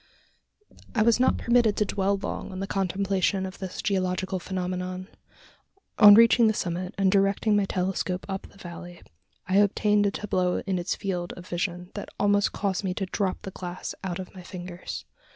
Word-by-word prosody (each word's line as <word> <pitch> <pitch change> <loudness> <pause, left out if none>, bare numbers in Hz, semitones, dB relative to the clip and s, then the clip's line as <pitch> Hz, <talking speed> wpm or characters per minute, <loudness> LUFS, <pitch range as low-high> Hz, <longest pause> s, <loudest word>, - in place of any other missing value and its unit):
I 215 - +4
was 230 +1 +4
not 255 - +3
permitted 235 -3 +3
to 210 - +2
dwell 195 0 0
long 195 - -5
on 185 - -6
the 195 - -2
contemplation 195 0 0
of 190 0 -8
this 190 -2 -6
geological 185 -1 -1
phenomenon. 185 +1 -4 0.9
On 205 -1 +11
reaching 230 +1 +6
the 215 - +2
summit, 180 0 -3
and 195 -1 +3
directing 200 +2 +2
my 205 -1 +3
telescope 185 -1 -2
up 195 -1 -5
the - - -20
valley, 175 -1 -10 0.4
I 185 +1 +2
obtained 205 0 +3
a - - +3
tableau 185 -3 -1
in 190 -3 0
its 175 +1 -2
field 180 -3 -3
of 180 0 -11
vision 175 0 -3
that 205 - -6
almost 205 0 +3
caused 195 -1 -2
me 185 -2 -2
to 195 - -2
drop 190 +1 -2
the 195 - -6
glass 180 -1 -6
out 180 -2 -3
of 185 -1 -8
my 185 - -10
fingers! 180 0 -7
190 Hz, 180 wpm, -26 LUFS, 180-205 Hz, 0.9 s, On